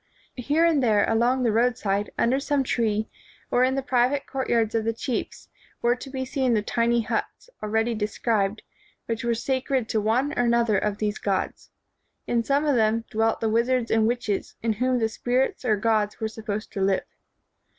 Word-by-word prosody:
Here 295 +7 +2
and 320 -4 +3
there, 215 -4 +3
along 240 +3 +2
the 235 - +2
roadside, 215 -3 +1
under 255 +3 +2
some 285 -1 0
tree, 220 -4 0 0.4
or 245 - +3
in 260 +1 +2
the 270 - -1
private 260 +1 +1
courtyards 235 -5 0
of 225 -1 +1
the 225 +1 0
chiefs 235 +1 -4 0.4
were 240 +1 +3
to 265 +2 -10
be 260 -1 -4
seen 255 -2 0
the 210 - +1
tiny 235 +1 +1
huts, 365 - -4
already 220 +2 0
described, 215 -1 -1 0.4
which 230 +1 -3
were 235 -1 +1
sacred 260 0 -1
to 215 - +1
one 245 +7 +1
or 275 - 0
another 235 -3 +2
of 210 -1 -2
these 210 -1 -2
gods. 195 -2 -2 0.6
In 235 -1 0
some 280 +5 +1
of 290 -3 +2
them 225 0 +2
dwelt 225 +1 +1
the 225 - +1
wizards 235 +2 +1
and 220 -1 +3
witches, 230 -4 -2
in 225 -1 +1
whom 250 +4 +1
the 225 -2 +1
spirits 245 +5 -1
or 220 -4 +2
gods 210 0 0
were 220 - -1
supposed 215 -1 -5
to 195 - -3
live. 190 0 +2
230 Hz, 185 wpm, -25 LUFS, 220-255 Hz, 0.6 s, and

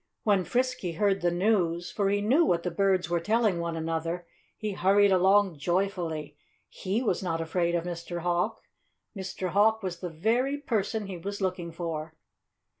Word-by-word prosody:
When 200 -5 +2
Frisky 250 -8 -1
heard 195 +2 +1
the 175 - +3
news 175 -2 +1
for 200 -2 0
he 205 0 +1
knew 260 +11 +4
what 170 - +1
the 180 - -2
birds 190 -1 +2
were 170 0 0
telling 210 0 +1
one 170 -1 -3
another 165 +2 -2 0.3
he 215 -1 -3
hurried 200 +1 +4
along 190 -2 +4
joyfully. 170 -3 -1 0.3
He 200 +6 -2
was 200 -7 0
not 165 -3 -2
afraid 170 +1 0
of 170 - 0
Mr. 175 0 -5
Hawk. 175 0 -1 0.5
Mr. 190 -1 -4
Hawk 215 +4 +3
was 180 -2 -4
the 180 - -4
very 235 - 0
person 220 -5 -1
he 190 -2 -6
was 200 +4 -5
looking 180 -3 -2
for. 160 -1 -5
185 Hz, 170 wpm, -28 LUFS, 170-205 Hz, 0.5 s, knew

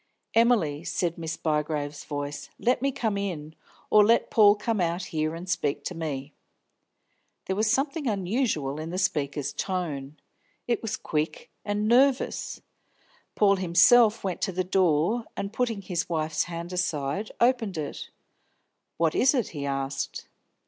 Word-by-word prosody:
"Emily," 215 -11 +3
said 170 -1 -1
Miss 160 -1 -4
Bygrave's 150 -2 -2
voice, 145 0 -5
"let 250 +1 +1
me 275 +1 +1
come 220 -7 -1
in 160 -6 -4 0.4
or 210 - +7
let 230 +3 +3
Paul 205 -2 +6
come 215 -1 -1
out 170 +1 0
here 155 -3 -2
and 175 +2 -8
speak 150 -6 -1
to - - -4
me." 150 -4 -5 1.1
There 190 - -1
was 215 +2 +1
something 275 +5 0
unusual 190 - -1
in 160 +1 -5
the 180 - -4
speaker's 145 -6 -1
tone; 155 -7 -3 0.5
it 240 - 0
was 225 - -3
quick 155 0 -3
and 205 +1 -1
nervous. 255 +3 +2 0.7
Paul 200 -2 +4
himself 215 +6 +5
went 185 -3 -3
to 195 - 0
the 185 0 -1
door, 185 +4 +2
and, 200 +1 -4
putting 230 -5 -1
his 180 -2 -2
wife's 155 -2 0
hand 170 +1 -6
aside, 165 +2 -1
opened 235 -7 +2
it. 150 -2 -5 0.9
"What 165 -1 +2
is 270 +3 +4
it?" 245 -5 0
he 145 -3 -5
asked. 135 0 -3
180 Hz, 150 wpm, -27 LUFS, 155-215 Hz, 1.1 s, or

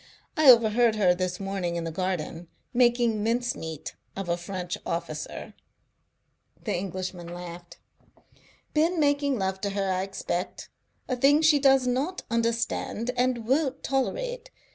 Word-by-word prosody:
"I 310 -3 +6
overheard 230 -1 +6
her 190 -4 +4
this 180 0 -2
morning, 195 -3 -2
in 170 - -2
the 165 - -3
garden, 175 -1 -3 0.3
making 240 -3 +3
mincemeat 225 - -2 0.2
of 195 -2 -4
a 170 - +2
French 175 0 -4
officer." 165 -2 -4 1.1
The - - -1
Englishman 180 -1 -4
laughed. 175 0 -9 1.0
"Been 330 +3 +2
making 285 -2 +2
love 190 -1 -2
to 200 - -1
her, 195 -1 -1
I 185 0 0
expect. 190 -2 -4 0.4
A 255 - 0
thing 285 +5 +4
she 305 -2 +6
does 270 -1 +5
not 270 +9 -1
understand 230 0 -1
and 245 -2 +1
won't 270 +2 +1
tolerate. 485 - -2
215 Hz, 135 wpm, -27 LUFS, 180-255 Hz, 1.1 s, I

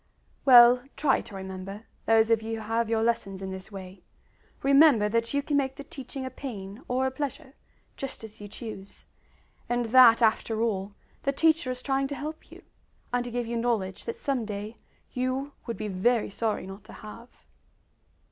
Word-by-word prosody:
Well, 245 -1 +9 0.2
try 285 -3 +3
to 205 - -12
remember, 190 +2 -7 0.2
those 225 0 +4
of 225 -1 +4
you 225 +1 -3
who 215 - -8
have 230 0 0
your 225 -1 +1
lessons 225 -5 -1
in 190 0 -5
this 190 +2 -8
way! 190 -1 -9 0.6
Remember 275 -5 +6
that 230 +2 0
you 285 0 0
can 290 0 0
make 265 -1 0
the 285 - -8
teaching 270 -1 -7
a 260 - -5
pain 215 -5 -7
or 255 +1 +1
a 265 - 0
pleasure, 265 -1 -5 0.4
just 270 -4 -6
as 220 0 -11
you 205 - -7
choose; 205 -2 -9 0.6
and 240 0 +1
that, 245 -3 +8
after 220 0 +2
all, 200 -3 -2 0.3
the 275 - +1
teacher 315 0 +2
is 255 0 -4
trying 270 0 +1
to 285 - -5
help 305 +3 -7
you, - - -13 0.5
and 245 0 +1
to - - -4
give 240 0 -2
you 235 +1 -3
knowledge 220 -6 -1
that 465 - -3
some 275 - -1
day 210 +1 -6 0.3
you 255 +3 -2 0.2
would 230 - -3
be 215 - -4
very 210 +4 +1
sorry 215 -1 -2
not 195 +1 -9
to - - -12
have. 230 +3 -11
230 Hz, 185 wpm, -27 LUFS, 210-265 Hz, 0.6 s, Well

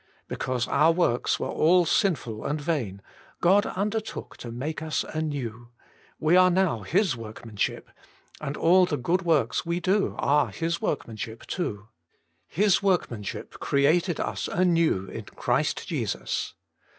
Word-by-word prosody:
Be - - -4
cause 125 -2 -1
our 160 +2 +4
works 165 -8 +1
were - - -2
all 175 +3 +4
sinful 135 - 0
and 150 +2 -1
vain, 130 - -2 0.4
God 195 +4 +4
undertook 210 +3 -3
to 120 - -8
make 145 +7 -4
us 155 -1 -1
anew 130 -7 -4 0.2
— - - -31
we 155 +3 +3
are 185 0 +7
now 180 -9 +2
His 175 - +1
workmanship, 110 -2 -4 0.5
and 140 +2 -4
all 180 +2 +5
the 150 - -1
good 175 +8 0
works 165 -5 +1
we 170 +1 -1
do 195 +3 +1
are 145 +1 +3
His 170 +1 -2
workmanship 115 -4 -4
too. 105 - -4 0.3
' - - -46
His 205 -3 +4
workmanship, 170 - -2
created 160 +5 +2
us - - -2
anew 170 - +2
in - - -7
Christ - - -1
Jesus.' - - -3
155 Hz, 145 wpm, -26 LUFS, 120-180 Hz, 0.5 s, are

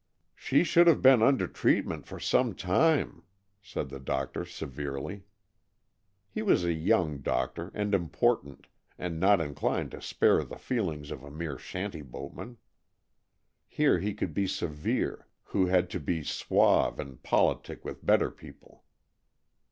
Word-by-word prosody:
"She 140 - +2
should 170 0 +5
have 165 - +5
been 130 -3 +7
under 135 +3 +4
treatment - - 0
for - - -8
some 120 -6 +1
time," 140 - +1 0.4
said 100 -9 -5
the 70 0 -8
doctor 70 +4 -3
severely. 70 +3 -6 1.0
He 215 - -5
was 200 - +3
a 85 -1 +1
young 80 -2 +1
doctor, 70 +6 -2
and 105 0 -1
important, 85 -4 0 0.3
and 85 -2 -4
not 100 +2 +5
inclined 75 -3 -2
to - - -9
spare - - +2
the - - -9
feelings 80 - -3
of 65 - -7
a 70 - -10
mere 75 -2 -5
shanty 90 -3 -5
boatman. 95 - -9 1.1
Here 150 -11 +2
he 100 +3 -2
could 90 -6 -3
be 100 +4 0
severe, 75 -4 -2 0.2
who 95 -2 0
had 90 0 +3
to 90 - -3
be 80 +1 -2
suave - - +2
and 65 -3 -7
politic - - 0
with - - -7
better - - +3
people. - - -16
90 Hz, 145 wpm, -29 LUFS, 75-105 Hz, 1.1 s, been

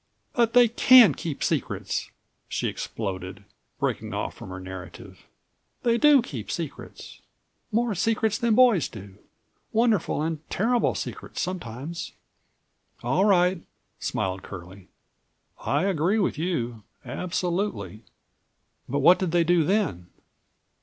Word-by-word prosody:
"But 235 -2 +2
they 245 -1 +7
can 235 - +7
keep 150 +1 -5
secrets!" - - -2 0.4
she - - -1
exploded, 95 -2 -5 0.4
breaking - - -2
off - - -3
from - - -11
her 95 0 -7
narrative. 95 -2 -10 0.6
"They 235 -1 +2
do 290 -3 +6
keep - - -7
secrets—more 235 0 -5
secrets 220 +3 0
than 235 -3 +2
boys 240 - +5
do. 100 -2 -11 0.5
Wonderful 220 -9 +1
and 160 -1 -2
terrible 235 +4 +1
secrets - - -6
sometimes!" 165 -2 -5 0.9
"All 135 +11 +2
right," 180 -3 +3 0.4
smiled 95 0 -2
Curlie, 90 0 -10 0.8
"I 145 +5 +1
agree 190 +2 +1
with 205 - +1
you, 135 -9 -2 0.2
absolutely, 175 - -3 0.9
but 140 +3 0
what 175 +6 +6
did 185 - -1
they 175 0 +3
do 170 0 +3
then?" 165 - 0
175 Hz, 115 wpm, -25 LUFS, -, 0.9 s, they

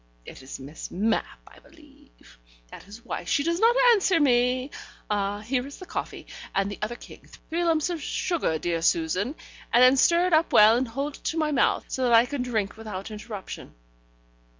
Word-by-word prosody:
It - - -11
is 130 +1 -9
Miss 140 +4 -9
Mapp, 220 +5 -1
I - - -17
believe: - - -21 0.3
that - - -12
is 215 +3 -13
why - - -5
she 285 - 0
does 335 +2 -1
not 460 +3 +4 0.2
answer 385 -6 +3
me. 255 -1 +2 0.4
Ah! 205 0 -1
here 250 +4 -2
is 280 - -11
the 370 - -10
coffee, - - -6 0.3
and 195 +1 0
the - - -8
other 215 +3 -3
king: - - -14 0.2
three 340 +2 0
lumps 330 0 +1
of 335 -3 -4
sugar, 320 - -1
dear 165 +1 -2
Susan, 175 - 0 0.4
and 240 +2 +5
then 255 +2 +6
stir 340 +6 +4
it 365 - 0
up 315 +1 +3
well, 215 +2 +7
and 255 +2 0
hold 275 +5 -4
it - - -26
to 325 - -2
my 310 -1 0
mouth, 280 - +1
so 260 - -4
that 240 - +2
I 230 +1 +7
can 280 +1 -4
drink 220 -5 -2
without 215 -2 -7
interruption. 210 - -8
245 Hz, 195 wpm, -25 LUFS, 205-300 Hz, 0.4 s, well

